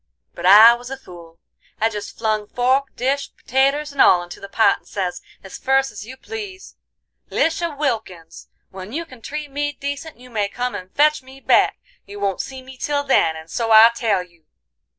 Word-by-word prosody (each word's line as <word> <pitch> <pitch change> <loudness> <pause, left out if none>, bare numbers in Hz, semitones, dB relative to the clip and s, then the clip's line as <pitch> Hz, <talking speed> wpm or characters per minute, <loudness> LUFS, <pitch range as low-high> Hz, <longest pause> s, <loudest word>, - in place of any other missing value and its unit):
But 175 +1 -2
I 215 +4 +9
was 245 +1 -8
a 270 - -5
fool. 170 -7 -14 0.4
I 225 - +3
jest 210 -2 -7
flung 215 -2 -1
fork, 260 +4 +1
dish, 275 +3 -1
pertaters 275 +4 0
and 280 - 0
all 175 -1 +6
into 175 - -10
the 200 - -10
pot, 220 +2 +3
and - - -28
says, 180 -3 -4 0.2
as 190 - -10
ferce 270 0 +1
as 210 0 -9
you 260 +1 -10
please: 405 +2 -8 0.5
"'Lisha 330 -2 -1
Wilkins, 220 - -4 0.2
when 190 +3 -9
you 335 +3 -3
can 255 -6 -15
treat 295 +3 -6
me 290 +1 -2
decent 285 +3 -6
you 250 +1 -15
may 205 -3 -1
come 245 +3 -3
and 185 0 -8
fetch 300 0 +3
me 265 +1 -15
back; - - +3 0.3
you 205 +1 -9
won't 195 -2 -1
see 265 -1 -9
me 260 0 -13
till 285 +2 -1
then, 210 - +2
and 160 +1 -11
so 230 -2 -2
I 220 +1 +9
tell 215 -6 0
you. 170 -3 -24
245 Hz, 195 wpm, -20 LUFS, 200-280 Hz, 0.5 s, I